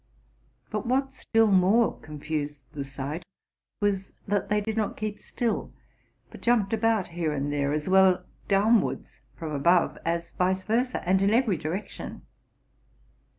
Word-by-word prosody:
But - - -3
what 265 +2 +1
still 225 -4 +2
more 195 +5 +4
confused 150 -1 -5
the 145 -3 -4
sight 140 +4 -5 0.6
was, 195 -2 0
that 205 -1 0
they 210 0 +3
did 215 +1 -3
not 220 -2 -1
keep 215 -1 -4
still, 235 -3 -2 0.6
but - - -11
jumped 230 -4 +2
about 225 -3 +1
here 165 -2 -2
and 145 0 -2
there, 140 -1 0
as 150 0 -2
well 185 -1 +5 0.2
downwards 210 +3 +2
from 160 -2 -6
above 170 +5 +2
as 170 0 -2
vice 185 +1 0
versa, 235 -1 -1
and 190 +1 +3
in 200 +1 +3
every 235 -6 +3
direction. 170 +6 -5
190 Hz, 145 wpm, -27 LUFS, 155-215 Hz, 0.6 s, well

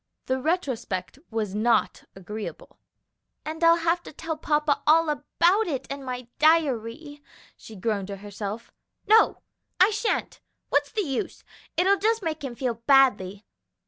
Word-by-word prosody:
The 260 0 -1
retrospect 260 - -2
was 220 -4 -3
not 220 +1 +1
agreeable. 210 +3 -8 0.7
"And 320 +2 -5
I'll 335 0 +7
have 335 +1 +1
to - - -11
tell 320 +2 -5
papa 300 -1 0
all 320 +1 +5
about 340 +8 +2
it 270 -5 -3
in 275 0 -5
my 250 -2 -5
diary," 290 -2 +1 0.3
she 220 - -13
groaned 200 -1 -2
to 200 - -5
herself. 205 +3 -7 0.3
"No, 440 +2 +4 0.4
I 380 +4 +6
sha'n't; 435 +1 -2 0.3
what's 285 0 +1
the 425 - -1
use? 270 -6 -4 0.3
it'll 390 +2 +3
just 440 +1 +1
make 315 -2 -3
him 255 -3 -5
feel 235 -2 -3
badly. 220 -8 +3
280 Hz, 145 wpm, -25 LUFS, 225-330 Hz, 0.7 s, I'll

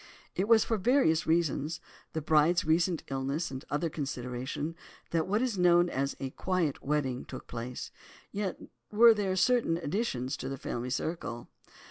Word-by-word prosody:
It 190 - 0
was 225 -1 +6
for 225 - 0
various 220 - +3
reasons, 160 -1 +1 0.3
the 160 -2 -3
bride's 160 +4 +3
recent 165 +1 +2
illness 135 +5 -2
and 130 0 -6
other 150 +3 0
considerations, 135 +1 -4 0.4
that 165 0 +1
what 210 +5 +1
is 230 -7 -1
known 175 0 +5
as 140 +1 -1
"a 135 -1 -4
quiet 180 -4 -1
wedding" 135 -3 -1
took - - -9
place, 120 +1 -6 0.4
yet 200 -2 -3 0.3
were 230 +2 +8
there 200 -3 -1
certain 190 -3 +3
additions 145 - -2
to 130 - -5
the 135 - -4
family 120 0 -4
circle. 130 -3 -3
160 Hz, 155 wpm, -30 LUFS, 135-185 Hz, 0.4 s, were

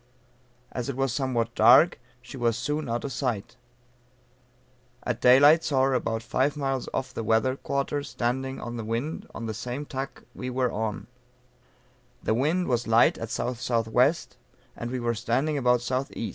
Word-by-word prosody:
As 125 +2 -4
it 135 - -3
was 135 -3 0
somewhat 120 -4 -1
dark 120 +11 +6 0.2
she 125 - -10
was 120 -2 0
soon 150 +1 -2
out 120 +1 -2
of 140 - -4
sight. 120 -8 -3 1.5
At 125 -2 -3
daylight 145 +6 +7
saw 135 -3 +2
her 135 0 +2
about 115 -3 -1
five 140 +5 0
miles 135 -3 -2
off 130 -1 -3
the 115 - -4
weather 115 +4 +2
quarter 140 +1 -2
standing 130 -1 -3
on 120 0 -6
the 115 - -4
wind 115 +8 -3
on 115 - -5
the 110 - -3
same 125 +6 -5
tack 135 0 -6
we 125 - -5
were 125 -1 0
on, 110 -1 -3 1.2
the - - +1
wind 155 +10 +1
was 120 -2 0
light 115 +1 +4
at 115 - -4
SSW 125 +4 +1 0.5
and 120 - -5
we 130 +1 -3
were 120 -1 0
standing 125 +7 0
about 125 -3 +2
S.E. 130 -2 -2
125 Hz, 165 wpm, -26 LUFS, 115-135 Hz, 1.5 s, daylight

